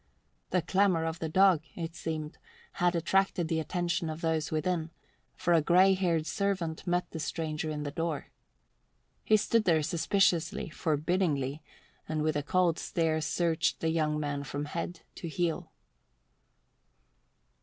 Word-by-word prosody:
The 180 -3 +1
clamour 185 -2 +2
of 165 +1 -3
the 160 - -3
dog, 185 -1 +5
it 165 -1 -5
seemed, 155 -2 -5 0.4
had 175 0 +3
attracted 175 0 +1
the 160 - +1
attention 170 0 -1
of 155 +1 -5
those 160 -2 0
within, 160 +1 -1 0.5
for 175 - +1
a 165 - +5
grey 185 +5 +5
haired 170 -4 +1
servant 175 0 -2
met 175 0 0
the 160 - -5
stranger 155 0 -3
in 150 -1 -3
the 145 - -4
door. 165 -1 -3 0.9
He 215 - +5
stood 225 +1 +1
there 160 -3 +3
suspiciously, 170 0 +1
forbiddingly, 155 -3 0 0.5
and 155 -1 -1
with 155 0 +1
a 145 - +1
cold 170 +2 +1
stare 160 -2 0
searched 165 +1 0
the 160 - 0
young 155 -2 +1
man 145 -1 -2
from 145 +1 -4
head 170 +3 -5 0.2
to 170 - -5
heel. 170 0 -2
165 Hz, 145 wpm, -30 LUFS, 155-175 Hz, 0.9 s, dog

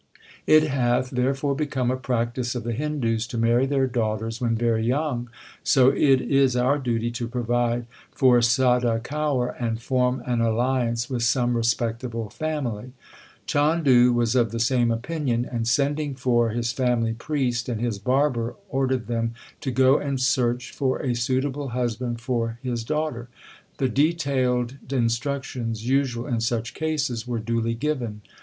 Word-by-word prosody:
It 155 0 +7
hath 130 -3 0
there 130 +2 +1
fore 140 +1 -1
become 135 -4 -1
a - - 0
practice 120 -1 -2
of 120 - -3
the 120 - -3
Hindus 120 -5 -1
to 120 - -5
marry 120 +3 +3
their 135 -1 +2
daughters 115 -1 -2
when 115 -2 +1
very 115 -1 +1
young, 125 -1 -1 0.3
so 130 -2 +5
it 135 -1 +4
is 135 -2 +2
our 130 +4 +2
duty 120 -3 -1
to 120 0 -4
provide 120 0 0 0.3
for 125 -2 +4
Sada 120 -1 +3
Kaur, 135 -1 -1
and 115 -2 -1
form 125 0 0
an 120 -2 0
alliance 120 +1 0
with 125 -3 -3
some 120 +1 +2
respectable 115 -1 -1
family/ 130 -6 -4 0.5
Chandu 145 -5 +4
was 120 -1 +1
of 120 -3 +3
the 115 +2 -4
same 120 0 +2
opinion, 120 0 -1
and 115 -2 -3
sending 145 +3 0
for 120 -2 +2
his 115 +1 -2
family 120 -3 +1
priest 125 -1 -2
and 115 -3 -2
his 115 -4 -2
barber 125 0 +1
l - - -29
ordered 130 -4 0
them 115 -1 -2 0.2
to 135 - -3
go 130 +2 +4
and 140 -2 -2
search 125 -1 +1
for 130 -2 -1
a 125 - 0
suitable 130 +4 -1
husband 120 -1 -2
for 115 -1 -2
his 120 -3 -2
daughter. 150 -3 -2 0.5
The 135 - +1
detailed 130 -3 +1
instructions 120 -2 -2
usual 130 -3 +1
in 120 -5 -1
such 115 0 -1
cases 140 -7 -2
were 120 -1 -2
duly 115 +1 -1
given. 120 -5 -3
125 Hz, 155 wpm, -24 LUFS, 115-135 Hz, 0.5 s, It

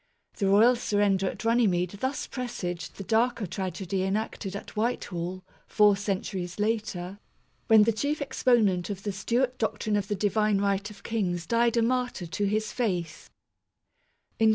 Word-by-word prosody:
The 200 - +1
royal 220 +6 +6
surrender 205 -4 +1
at - - -8
Runnymede 200 -5 +2
thus 265 +3 -2
presaged 190 -9 -5
the 195 - -7
darker 230 +2 +1
tragedy 190 +1 -3
enacted 195 0 -2
at 200 - -8
Whitehall, 185 -5 -2 0.2
four 210 -2 +5
centuries 190 -3 -3
later, 210 -3 -2 0.5
when 220 -1 +7
the 230 +1 +2
chief 285 +8 -1
exponent 235 - +2
of 195 -1 -5
the 205 - -2
Stewart 245 +6 -1
doctrine 215 -1 -1
of 200 -1 0
the 205 - -1
Divine 210 +1 +1
Right 200 +1 0
of 205 -1 -14
Kings 180 -7 -1
died 235 +3 +2
a 230 - +4
martyr 250 -5 -1
to 165 +5 -2
his 215 +2 0
faith. 180 -9 -3
205 Hz, 150 wpm, -27 LUFS, 190-230 Hz, 0.5 s, when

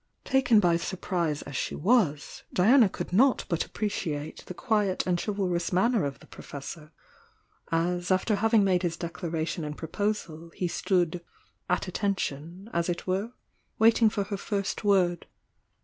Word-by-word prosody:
Taken 250 -5 +4
by 175 -4 +3
surprise 170 -3 -2
as 140 - -9
she - - -2
was, 175 - +1
Diana 220 +4 +5
could 180 - -6
not 255 +6 +4
but 170 -4 0
appreciate 160 -8 -4
the 180 - -7
quiet 210 -5 0
and 175 -1 0
chivalrous 185 -5 -1
manner 200 +1 +2
of 140 -1 -4
the - - -14
Professor, 150 +2 -9 0.8
as 175 +2 0
after 190 +3 +2
having 225 0 +4
made 185 -2 +2
his 175 -3 -2
declaration 165 0 -3
and 150 0 -5
proposal, 170 -2 -3
he 180 - -1
stood 175 -1 0 0.5
"at 180 +1 0
attention" 185 -2 -3
as 170 +1 0
it 175 - -3
were, 195 +6 -2 0.4
waiting 225 0 +5
for 205 -1 -1
her 200 0 -4
first 200 +1 -3
word. 185 -4 +2
180 Hz, 150 wpm, -28 LUFS, 170-205 Hz, 0.8 s, Diana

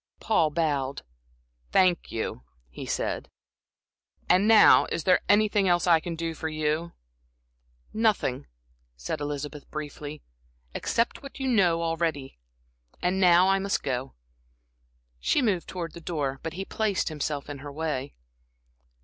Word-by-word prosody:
Paul 160 -2 +2
bowed. 145 -4 -1 0.7
"Thank 180 -2 +3
you," 110 - -3 0.3
he - - -8
said. - - -2 1.0
"And 185 +4 +4
now 220 -1 +7
is 165 - -2
there 185 +2 +4
anything 205 -1 +3
else 175 -1 +3
I 170 -2 +5
can 170 +1 -5
do 165 0 -3
for 160 0 -4
you?" 155 +2 -2 1.0
"Nothing," 215 - 0 0.5
said 65 - -4
Elizabeth, 145 0 -5
briefly, 150 0 -7 0.5
"except 230 +1 -1
what 275 0 -10
you 265 - -2
know 180 -9 +3
already. 160 - -2 0.6
And 180 +2 0
now, 180 0 +6
I 195 0 +3
must 195 +1 -1
go." 130 -1 -3 1.0
She - - +2
moved 205 -10 0
towards 170 -4 -5
the 170 - -10
door, 145 -5 -3
but 165 - -5
he 190 +3 -5
placed 210 -4 -1
himself 150 -2 -3
in 145 -1 -7
her 145 +1 -8
way. 145 -2 -3
165 Hz, 135 wpm, -27 LUFS, 145-185 Hz, 1.0 s, now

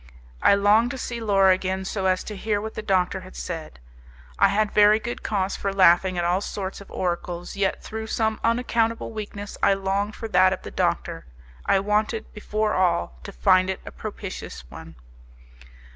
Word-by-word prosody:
I - - +6
longed 210 +4 +4
to 265 - -5
see 235 -2 -5
Laura 195 -3 +4
again, 190 0 -2
so 190 0 -1
as 185 0 +1
to 210 - -7
hear 205 +1 -1
what 220 +1 -6
the - - -5
doctor 190 -2 +1
had 185 0 -13
said. 165 - -6 0.6
I - - +7
had 210 +1 +1
very 210 +1 +5
good 240 +2 -5
cause 195 -2 -1
for 200 - -2
laughing 185 -1 +4
at 175 - 0
all 180 +2 +1
sorts 195 -1 -5
of 200 - -13
oracles, 175 0 -3
yet 195 -1 -1
through 220 0 -6
some 220 -1 0
unaccountable 230 -1 0
weakness 205 -2 -7
I 195 - +4
longed 195 +2 -1
for 225 - -6
that 185 -1 +5
of - - -7
the - - -8
doctor; - - -1 0.4
I 195 - +4
wanted, 210 +2 -1
before 210 0 -1
all, 85 - 0
to - - -8
find 185 - +3
it 190 - -2
a - - -7
propitious 200 - -7
one. - - -11
200 Hz, 185 wpm, -24 LUFS, 185-215 Hz, 0.6 s, I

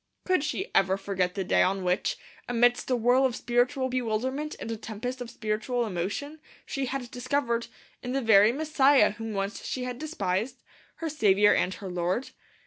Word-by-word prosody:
Could 370 -6 +2
she 385 +6 -3
ever 190 0 +3
forget 190 -2 -2
the 195 - -1
day - - +2
on 190 0 +1
which, 180 0 0 0.3
amidst 245 +1 +2
a 255 - +3
whirl 245 +3 +3
of 260 -3 +1
spiritual 245 +2 +1
bewilderment 255 +4 -2
and 230 - -5
a - - -2
tempest 230 +4 -6
of 245 - -5
spiritual 230 +2 -2
emotion, 210 - -4 0.3
she 270 -1 -3
had 250 -2 -4
discovered, 245 -2 -1 0.3
in 250 - -5
the 275 - 0
very 215 -1 +6
Messiah 280 -4 +4
whom 225 +1 -6
once 195 +1 -3
she 255 - -3
had 250 -1 -5
despised, 240 - -2 0.4
her - - 0
Saviour 210 -9 +4
and 185 - 0
her 195 - -8
Lord? 180 +7 -2
240 Hz, 175 wpm, -27 LUFS, 205-260 Hz, 0.4 s, very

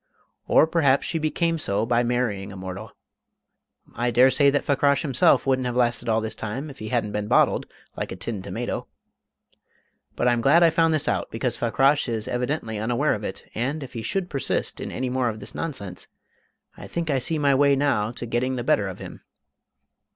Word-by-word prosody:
Or - - +5
perhaps 145 -5 +2
she 165 - -1
became 165 +1 0
so 105 -5 0
by 120 0 +2
marrying 120 -5 -1
a - - -9
mortal; 95 +3 -7 1.0
I 120 +2 -1
dare 125 +3 +5
say 140 +2 +4
that 145 +1 0
Fakrash 140 +1 +2
himself 160 +4 +3
wouldn't 130 -2 +1
have 120 - -3
lasted 120 -1 +1
all 110 0 +2
this 110 0 -3
time 130 +8 -5
if 140 - -15
he 110 - -6
hadn't 115 -2 -1
been 105 0 -3
bottled, - - +3 0.3
like - - -4
a - - -4
tinned 100 +1 -5
tomato. - - -4 1.3
But - - 0
I'm 120 -1 +2
glad 150 +8 +5
I 165 - +6
found 165 0 +3
this 155 - 0
out, - - -1
because - - -2
Fakrash 140 0 +2
is 110 -2 -3
evidently 125 -3 -2
unaware 120 +7 +1
of 105 - -5
it, - - -6
and, 135 +6 -2
if 135 - -10
he 115 - -4
should 190 - -2
persist 140 -6 -2
in - - -5
any 125 -1 -3
more 130 -1 +1
of 110 -1 -6
this - - -6
nonsense, 100 - -5 0.7
I - - -10
think 165 -2 -2
I 135 - +2
see 155 +6 0
my 145 -2 +3
way 140 +1 +4
now 135 -7 +1
to 120 +1 -6
getting 120 +3 -1
the 120 - -3
better 105 -4 +2
of 95 - -6
him." - - -10
125 Hz, 200 wpm, -24 LUFS, 110-145 Hz, 1.3 s, I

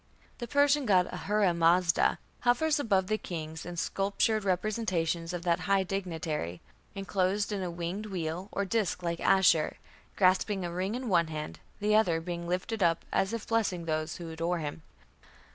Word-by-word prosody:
" - - -31
The 240 - -4
Persian 285 -1 +3
god 185 -3 +5
Ahura 205 -3 +1
Mazda 170 +1 +3 0.2
hovers 290 +6 +2
above 200 -8 +2
the 215 +3 -1
king 160 -3 -6
in 175 0 -7
sculptured 200 +4 0
representations 180 -4 -1
of 175 -1 -4
that 170 0 +2
high 195 -1 +4
dignitary, 165 - -3 0.4
enclosed 195 +1 0
in 200 -2 -2
a 180 - -2
winged 175 +5 -4
wheel, 180 0 -4
or 200 - -1
disk, 195 -3 -1
like 170 -1 -2
Ashur, 185 -5 +3 0.4
grasping 190 0 +2
a 170 - -4
ring 190 +5 -2
in 255 0 -4
one 170 -5 +3
hand, 155 -1 -6 0.2
the 210 +1 +1
other 180 -7 +3
being 170 0 -5
lifted 185 +5 -2
up 170 -2 +2
as 195 +2 +1
if 230 -2 -4
blessing 200 -7 0
those 155 0 -2
who 170 -2 -7
adore 165 +2 -1
him. 155 0 -5
185 Hz, 170 wpm, -30 LUFS, 170-205 Hz, 0.4 s, god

